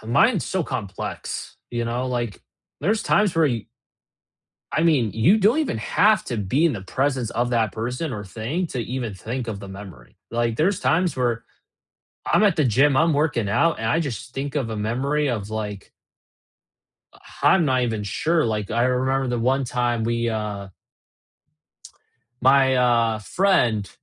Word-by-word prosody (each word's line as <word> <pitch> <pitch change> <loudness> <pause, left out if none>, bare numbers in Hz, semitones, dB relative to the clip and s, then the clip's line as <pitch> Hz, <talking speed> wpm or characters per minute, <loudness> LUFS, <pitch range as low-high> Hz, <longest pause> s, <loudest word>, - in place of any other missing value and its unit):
the 110 - -11
mind's 215 - +3
so 185 -2 -1
complex, 105 - -5
you 120 -1 -2
know, 120 +2 -2
like, 120 -5 -3 0.4
there's 205 +8 +1
times 205 -4 +2
where, 165 -1 +4
y 115 -6 -2 1.0
I 160 - 0
mean, 145 -10 +3
you 120 - +4
don't 215 +8 +3
even 300 - -1
have 215 - +3
to 120 - -3
be 105 - +1
in 165 - +3
the 100 -6 -5
presence 130 +2 -1
of 120 +2 -1
that 115 -5 +1
person 125 +7 -3
or 105 -2 -5
thing 115 - -3
to 130 - -5
even 120 -2 -4
think 115 +6 -5
of 105 -3 -4
the 100 -1 -9
memory, 95 -11 -11
like, 115 -1 0
there's 185 +4 +2
times 175 -3 +1
where 120 -3 -1 0.9
I'm - - +4
at 205 - +4
the 150 - +2
gym, 135 +4 +3
I'm 165 +3 +4
working 145 -8 0
out, 165 +11 +2
and 110 - -3
I 165 - +2
just 130 -5 -4
think 140 +1 -4
of 135 -6 -1
a 110 - -4
memory 135 +8 0
of, 110 -5 -3
like 105 -3 -5 1.2
H - - -20 0.2
I'm 185 - +5
not 130 -2 +2
even 110 -3 -1
sure, 160 - +1
like, 105 -3 -2
I 120 +2 +1
remember 130 +1 +1
the 120 -1 -1
one 130 +4 +1
time 120 -2 -1
we, 115 0 0
uh 105 -3 -4 1.7
my, 130 0 +5
uh, 115 -3 +2
friend, 120 - +1
120 Hz, 170 wpm, -23 LUFS, 110-145 Hz, 1.7 s, I'm